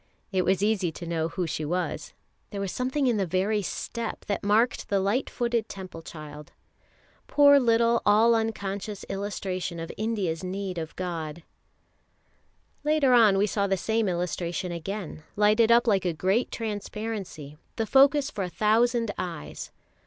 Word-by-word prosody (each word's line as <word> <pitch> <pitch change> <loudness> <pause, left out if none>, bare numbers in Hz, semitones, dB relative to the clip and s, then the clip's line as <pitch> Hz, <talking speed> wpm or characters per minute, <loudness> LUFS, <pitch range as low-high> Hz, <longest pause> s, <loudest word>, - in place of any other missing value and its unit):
It 185 -2 +1
was 190 +1 +2
easy 205 -5 +1
to 170 - -8
know 165 -1 -1
who 180 +2 -3
she 155 -1 -3
was, 175 +4 -2 0.4
there 200 - -5
was 195 -2 -2
something 260 +3 -1
in 240 -4 +2
the 195 - +1
very 195 +4 +1
step 230 +4 -5
that 200 - -2
marked 220 +5 +2
the 200 - +2
light 200 +7 0
footed 235 -2 -1
Temple 185 -4 -8
child. 150 -2 -10 0.8
Poor 285 -1 +6
little 235 -1 +3
all 220 +3 +5
unconscious 210 -2 -3
illustration 190 -3 -3
of 165 - -5
India's 200 -6 -2
need 185 -1 -4
of 160 -1 -6
God! 165 -3 -5 1.4
Later 300 -3 +3
on 220 -5 +6
we 200 - +3
saw 200 -1 0
the 195 0 +1
same 220 +1 0
illustration 175 +1 -2
again, 175 0 -5
lighted 215 +2 +4
up 235 +1 +6
like 200 -5 +2
a 175 - +1
great 190 +9 +1
transparency, 210 -8 -5 0.2
the 225 - -1
focus 275 +4 +4
for 200 - -3
a 180 - -3
thousand 230 +3 +2
eyes. 170 - -5
200 Hz, 155 wpm, -27 LUFS, 180-225 Hz, 1.4 s, Poor